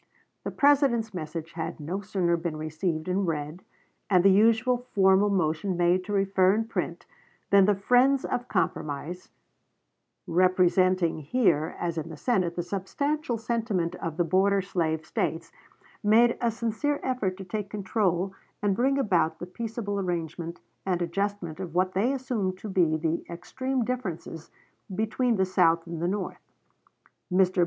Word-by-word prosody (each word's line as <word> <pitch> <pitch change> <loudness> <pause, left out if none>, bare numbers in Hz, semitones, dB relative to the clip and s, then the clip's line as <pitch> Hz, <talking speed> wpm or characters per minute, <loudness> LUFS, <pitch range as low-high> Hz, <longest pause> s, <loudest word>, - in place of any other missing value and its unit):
The - - -3
President's 270 -7 +3
message 165 -1 -5
had 165 -1 -5
no 175 +7 -4
sooner 190 -4 0
been 165 -2 -3
received 155 +1 -3
and 185 +1 0
read, 155 +2 -3 0.5
and 185 -2 +4
the 195 - +8
usual 225 +5 +4 0.2
formal 190 +1 +5
motion 180 0 0
made 175 +1 +3
to 205 - -6
refer 195 -1 +3
and 225 +1 -1
print, 175 -5 -3 0.5
than 200 -1 +7
the 205 0 +3
friends 250 +7 +3
of 245 0 -2
compromise, 170 - -2 1.0
representing 185 -1 +3
here, 160 - +1
as 170 -2 -2
in 155 - -6
the - - -8
Senate, 185 -9 0
the 175 - -2
substantial 240 - -2
sentiment 220 -6 -1
of 165 -1 -5
the 175 - +3
border 195 +4 +3
slave 160 -5 -1
States, 165 +1 -2 0.5
made 230 +3 +5
a 235 - +2
sincere 230 +5 -1
effort 215 -8 -1
to 195 - -7
take 200 +2 -4
control 195 -2 0 0.3
and 205 -2 +1
bring 270 +5 +2
about 185 -11 +1
the - - -6
peaceable 210 +1 -4
arrangement 170 -2 -4 0.2
and 180 -2 0
adjustment 185 -1 -3
of 175 -3 -6
what 185 +1 +2
they 215 +8 +2
assumed 240 -9 -2
to 210 - -7
be 170 -5 +2
the 160 +1 -1
extreme 255 +9 -3
differences 185 -9 -5 0.5
between 220 +4 +1
the 190 -2 +2
South 170 -3 +3
and 170 -1 -6
the 175 - +1
North. 195 0 -3 0.9
Mr. 185 0 +3
190 Hz, 150 wpm, -27 LUFS, 170-215 Hz, 1.0 s, the